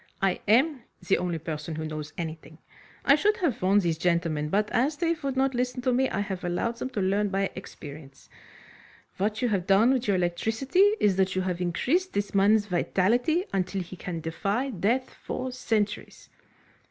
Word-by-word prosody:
"I 195 -1 0
am 260 +6 +3 0.3
the 195 - +3
only 175 -2 -2
person 160 0 -5
who 155 0 -4
knows 155 -1 -5
anything. 160 -2 -6 0.5
I 275 - +7
should 420 +8 +3
have 310 - -1
warned 195 +2 +3
these 165 -2 0
gentlemen; 165 -3 0
but, 210 +4 +1
as 280 +6 +1
they 335 0 +1
would 275 -2 -3
not 265 0 +2
listen 250 0 -2
to 255 -1 +2
me, 260 +2 +2
I 200 - -1
have 190 -3 -4
allowed 180 +7 -1
them 255 - -4
to 210 - -3
learn 200 +2 +1
by 195 0 -1
experience. 145 -6 -11 0.9
What 215 +5 -1
you 245 - +2
have 190 -4 -1
done 215 +6 +5
with 255 -1 -1
your 200 - +3
electricity 225 - +2
is 195 -3 +3
that 190 -1 +1
you 185 - 0
have 180 -1 -2
increased 270 - 0
this 205 0 -2
man's 205 +2 +4
vitality 235 - +1
until 190 0 -1
he 175 +2 -10
can 175 -2 -5
defy 200 - -2
death 235 +6 0
for 255 0 -5
centuries." 220 -4 -2
200 Hz, 185 wpm, -27 LUFS, 175-250 Hz, 0.9 s, I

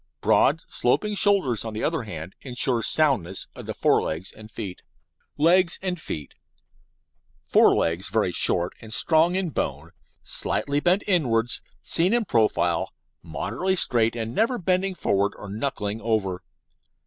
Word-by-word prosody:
Broad, - - +3
sloping 210 0 0
shoulders, 195 - +2
on 110 -1 -6
the 110 - -3
other 160 -2 0
hand, 85 -5 -7
insure 125 -2 +1
soundness 115 - +1
of - - -10
the - - -4
fore - - +3
legs 80 +5 -4
and 110 0 -13
feet. 105 -4 -7 0.6
LEGS 170 +3 +4
AND 180 -3 -3
FEET 75 - -6 1.1
Fore - - +5
legs 85 +4 0
very 105 -2 +1
short 85 0 +1
and 110 - -11
strong 160 +9 +3
in 185 -3 -1
bone, 75 - -3 0.3
slightly 145 0 -2
bent 180 +5 +2
inwards; 120 - +1 0.2
seen 175 +5 +1
in 240 -2 +2
profile, 115 - +1 0.3
moderately 120 - -2
straight 115 -9 +2
and 115 0 -4
never 230 - +1
bending 185 0 0
forward 100 - 0
or 105 - -9
knuckling 105 -1 -3
over. 100 -5 -1
115 Hz, 145 wpm, -24 LUFS, -, 1.1 s, Fore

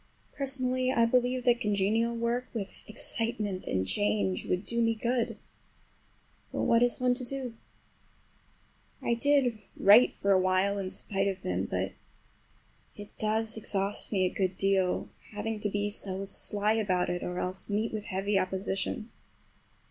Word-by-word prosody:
Personally, 255 -2 0
I 235 -3 +4
believe 250 +1 +1
that 240 -1 +4
congenial 215 +2 +1
work, 235 +2 -1
with 200 -4 -5
excitement 215 -3 -2
and 95 0 0
change, 100 -1 0
would 180 +3 -1
do 235 0 0
me 230 0 +2
good. 235 +1 -1 1.1
But - - -2
what 230 0 +4
is 245 0 +2
one 250 0 +3
to 250 +1 -3
do? 255 -1 -4 1.5
I 235 - +2
did 250 -2 +3 0.2
write 210 +5 +7
for 200 - -1
a 190 - +6
while 185 +2 +2
in 190 -1 -3
spite 195 +1 -2
of 190 -1 -3
them; 90 +1 -1
but 95 +1 -2 1.0
it 205 0 -11
does 220 +1 0
exhaust 200 -1 0
me 190 -3 +2
a 180 - -1
good 185 -1 -1
deal—having 195 +3 -1
to 210 - -1
be 205 +1 -1
so 195 -1 -1
sly 205 +2 -1
about 185 -5 +1
it, 175 0 -2
or 180 0 -4
else 185 +3 -3
meet 215 +3 -1
with 215 -1 -4
heavy 195 +1 0
opposition. 190 +3 -2
210 Hz, 150 wpm, -29 LUFS, 190-235 Hz, 1.5 s, write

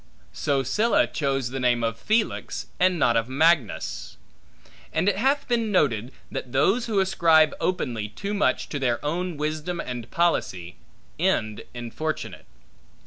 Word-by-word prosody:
So 140 -2 0
Sylla 225 - +2
chose 135 -4 -2
the 135 - -3
name 120 -2 +2
of 115 0 0
Felix, 215 - -1
and 185 0 +3
not 120 -7 +3
of 115 +1 +1
Magnus. 145 -3 +1 0.7
And 165 +4 0
it 205 - +3
hath 275 +6 +1
been 230 -3 0
noted, 125 - +1 0.2
that 125 - -5
those 195 - +2
who 215 -3 +1
ascribe 165 -5 +4
openly 120 - -1
too 200 - -5
much 205 - +1
to 145 - -3
their 120 -3 +1
own 175 +2 -2
wisdom 155 +3 -3
and 120 -2 -5
policy, 95 - 0 0.4
end 110 -1 0
infortunate. 120 +7 -5
150 Hz, 140 wpm, -25 LUFS, 120-185 Hz, 0.7 s, ascribe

